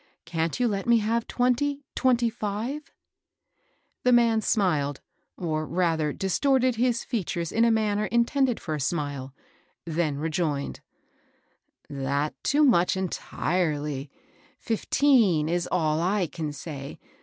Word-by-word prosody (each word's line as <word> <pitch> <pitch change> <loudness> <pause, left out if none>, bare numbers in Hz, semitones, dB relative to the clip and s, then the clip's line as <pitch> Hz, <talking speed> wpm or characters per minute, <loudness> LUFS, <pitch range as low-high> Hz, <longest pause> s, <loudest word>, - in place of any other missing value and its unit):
Can't 165 +3 -2
you 245 - +3
let 200 -2 -2
me 235 0 +6
have 225 +1 0
twenty, 275 +4 0
— - - -63
twenty 245 -2 +3
five? 230 +6 -4 0.5
" - - -45
The 250 - +4
man 235 -2 +4
smiled, 155 -11 +1 0.4
or 155 -3 -2
rather 165 -3 +1
distorted 255 - +1
his 240 0 +1
features 175 -8 -3
in 230 - +2
a 235 - +5
manner 215 -2 +1
intended 240 +2 +1
for 155 - -4
a 150 - -2
smile, 140 -2 -2 0.5
then 160 -3 -1
rejoined, 155 -2 -2 0.4
— - - -40 0.2
" - - -40
Dattoo 145 - 0
much, 180 -8 +3
entirely; 150 -6 -2 0.5
fifteen 225 - +2
is 175 +1 -1
all 155 -3 +1
I 190 +2 +1
can 155 -2 -5
say. 145 -1 -7
185 Hz, 130 wpm, -26 LUFS, 155-235 Hz, 0.5 s, me